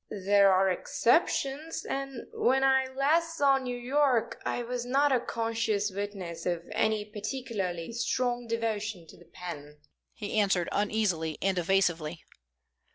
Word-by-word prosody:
"There 200 -1 +6
are 190 +1 +4
exceptions, 275 - +1
and 275 -2 -4
when 265 +2 +2
I 265 -1 +4
last 315 +6 +1
saw 275 -2 +4
New 250 -2 -4
York 255 -1 +1
I 245 - -2
was 245 0 -3
not 275 +4 +2
a 255 - +4
conscious 225 -3 -1
witness 190 -4 -5
of 175 -1 -1
any 215 -1 +1
particularly 210 -5 -4
strong 245 0 -1
devotion 220 -5 -2
to - - -15
the 175 - -17
pen," 155 -4 -9 0.4
he 215 -1 -2
answered, 195 -4 +2
uneasily 200 -7 0
and 195 0 +1
evasively. 170 -3 0
220 Hz, 135 wpm, -29 LUFS, 190-260 Hz, 0.4 s, There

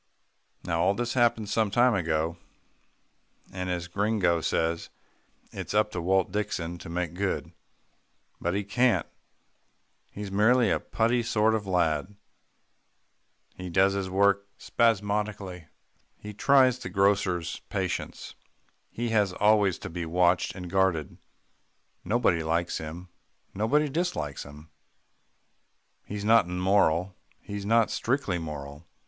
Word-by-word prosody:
Now 85 -1 -1
all 95 +3 +2
this 120 +1 -2
happened 120 -4 +2
some 110 0 +1
time 120 +4 +4
ago, 80 -3 0 1.2
and 90 -1 -4
as 90 -1 -3
Gringo 95 -3 +1
says, 80 +1 -1 0.6
"It's - - -6
up 105 0 +2
to 90 - -4
Walt 95 +1 +1
Dixon 85 -4 -3
to - - -9
make 85 -1 -3
good." 95 +2 -2 0.9
But 85 +2 -1
he 100 - -1
can't. 120 +5 +2 1.0
He's 100 -1 -7
merely 110 +2 +4
a - - +1
putty 115 +2 0
sort 110 -1 +2
of 105 -3 -2
lad. 90 0 0 1.4
He 90 0 -7
does 95 +3 +3
his 100 -1 -2
work 100 +1 +2
spasmodically, 105 -5 -1 0.5
he 105 0 -9
tries 130 +2 +4
the 90 - -6
grocer's 95 -3 +1
patience, - - -4 0.6
he 120 0 -3
has 105 -4 +2
always 105 -2 +3
to - - -8
be 85 -1 -4
watched 90 +2 +2
and 90 -2 -7
guarded. 90 -5 0 0.8
Nobody 105 -4 +1
likes 85 +2 -1
him, 85 +4 -8 0.4
nobody 140 +9 +1
dislikes 145 - -3
him. 75 +2 -13 1.3
He's 105 0 -6
not 115 -2 +5
immoral, 90 -1 +1 0.3
and 100 -1 -5
not 115 0 +3
strictly 120 -8 -1
moral. 75 0 -8
95 Hz, 125 wpm, -27 LUFS, 85-105 Hz, 1.4 s, not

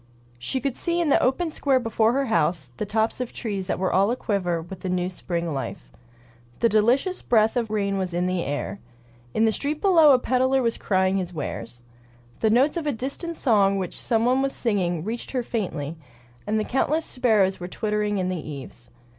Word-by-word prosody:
She 195 - -2
could 260 0 -2
see 340 0 0
in 335 -3 +1
the - - +4
open 315 +6 +1
square 275 -3 +2
before 225 -1 +1
her 275 +1 +1
house 170 - 0
the 210 - -3
tops 220 +4 0
of 250 - -4
trees 200 -5 -4
that - - -1
were 185 0 0
all 195 +2 +4
aquiver 200 -8 -1
with 175 +3 -9
the 185 - -4
new 180 0 0
spring 170 -2 -3
life. - - -5 0.7
The 230 - +3
delicious 245 - +2
breath 220 0 +3
of 235 -3 0
rain 200 -2 0
was 185 -1 -2
in 175 +1 0
the 185 -1 0
air. 145 +7 -3 0.6
In 220 - +4
the 220 - +3
street 290 +6 -2
below 330 -6 +6
a - - +6
peddler 260 +1 +1
was 230 -1 +1
crying 190 -1 +1
his 180 -2 -3
wares. 120 -5 -6 0.6
The 220 - +2
notes 265 +8 +3
of 320 -3 -3
a - - +2
distant 280 +7 -4
song 200 -6 +3
which 185 -3 -4
some 225 -1 +1
one 255 +2 +3
was 275 0 0
singing 180 -8 -1
reached 230 +6 -5
her 250 -2 0
faintly, 165 -10 -3 0.5
and 215 0 0
countless 305 +5 +1
sparrows 215 -7 +2
were 175 - -5
twittering 210 +1 -1
in 185 -1 -1
the 185 - -2
eaves. 135 -5 -9
215 Hz, 200 wpm, -24 LUFS, 185-255 Hz, 0.7 s, below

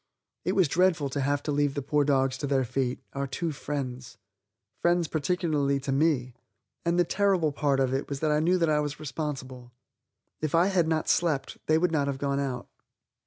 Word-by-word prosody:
It - - 0
was 190 -4 +4
dreadful 170 -2 +2
to 140 +1 -2
have 140 +1 0
to 150 - -2
leave 145 -1 +1
the 140 - -2
poor 145 +2 +2
dogs 135 -2 +2
to 145 - -2
their 135 -1 +2
fate 125 +1 -2
our 140 0 -2
two 160 +5 -2
friends; 130 -4 -5 0.6
friends 175 -1 +2
particularly 150 -3 0
to 135 0 -3
me. 135 -3 +1 0.5
And 170 +1 +1
the 175 - +5
terrible 185 -4 +2
part 140 -1 +1
of 130 -1 +1
it 135 +2 -2
was 140 -1 -3
that 155 -1 +2
I 150 - +3
knew 175 +4 +3
that 170 -2 +2
I 150 -1 +3
was 150 0 -3
responsible. 130 -5 -5 0.7
If 155 0 0
I 175 +3 +4
had 175 -4 +3
not 160 -1 0
slept 160 -5 0
they 155 - +4
would 175 +1 +1
not 145 -3 +1
have 140 -1 -2
gone 140 0 -1
out. 130 -3 -3
145 Hz, 205 wpm, -27 LUFS, 135-160 Hz, 0.7 s, the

